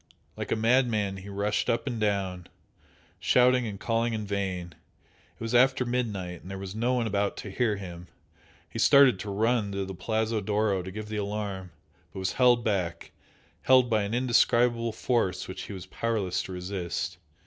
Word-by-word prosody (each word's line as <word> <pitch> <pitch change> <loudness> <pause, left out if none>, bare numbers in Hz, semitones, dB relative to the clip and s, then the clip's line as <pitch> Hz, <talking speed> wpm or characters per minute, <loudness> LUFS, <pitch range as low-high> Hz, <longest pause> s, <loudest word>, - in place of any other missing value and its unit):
Like - - -5
a - - +3
madman 110 -4 +2
he 95 +1 -9
rushed 100 +1 -1
up 115 0 0
and 120 -5 -3
down, 95 -4 -1 0.7
shouting 125 -1 +4
and 100 -2 -6
calling 115 0 0
in 105 -1 -3
vain 95 -3 -3 0.6
it - - -33
was 115 +1 -4
after 130 +1 +4
midnight 105 -8 -3
and 90 - -11
there 95 - -5
was 95 -1 -6
no 120 +4 0
one 120 -2 0
about 100 -2 -1
to 100 - -7
hear 110 +1 +1
him. 90 -3 -8 0.6
He - - -7
started 135 -8 +6
to 105 - -5
run 110 +1 +1
to 100 0 -2
the 95 - -6
Palazzo 110 +4 -1
d'Oro 105 -1 +1
to 90 - -7
give 105 +3 -6
the 110 - -3
alarm 100 -2 -3 0.4
but - - -11
was 95 -1 -1
held 125 -2 +4
back 90 -6 -2 0.5
held 130 -2 +5
by 110 -1 +3
an 100 +3 -2
indescribable 120 -1 +3
force 115 -5 -1
which - - -6
he - - -7
was 95 -1 -7
powerless 100 -2 -1
to 95 - -7
resist. 90 -1 -4
105 Hz, 180 wpm, -28 LUFS, 95-115 Hz, 0.7 s, started